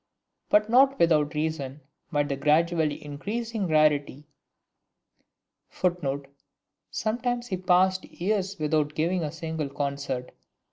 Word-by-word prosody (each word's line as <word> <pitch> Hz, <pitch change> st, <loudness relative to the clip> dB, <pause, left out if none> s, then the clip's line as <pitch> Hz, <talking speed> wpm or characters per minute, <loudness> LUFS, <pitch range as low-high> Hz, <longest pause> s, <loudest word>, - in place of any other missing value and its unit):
But 210 Hz, 0 st, +4 dB
not 270 Hz, +4 st, +5 dB
without 155 Hz, -3 st, +3 dB
reason, 150 Hz, -3 st, -3 dB, 0.3 s
might 145 Hz, -3 st, +1 dB
the 140 Hz, -, -1 dB
gradually 155 Hz, +2 st, +1 dB
increasing 210 Hz, +8 st, -3 dB
rarity 150 Hz, -2 st, +2 dB, 1.4 s
[Footnote: 145 Hz, -6 st, -1 dB, 0.6 s
Sometimes 240 Hz, +2 st, -1 dB
he 190 Hz, -6 st, -3 dB
passed 185 Hz, +1 st, +3 dB
years 195 Hz, +1 st, -2 dB
without 150 Hz, -1 st, 0 dB
giving 170 Hz, +3 st, 0 dB
a 150 Hz, -, -3 dB
single 160 Hz, -3 st, -4 dB
concert. 140 Hz, -2 st, -3 dB
160 Hz, 105 wpm, -27 LUFS, 145-190 Hz, 1.4 s, not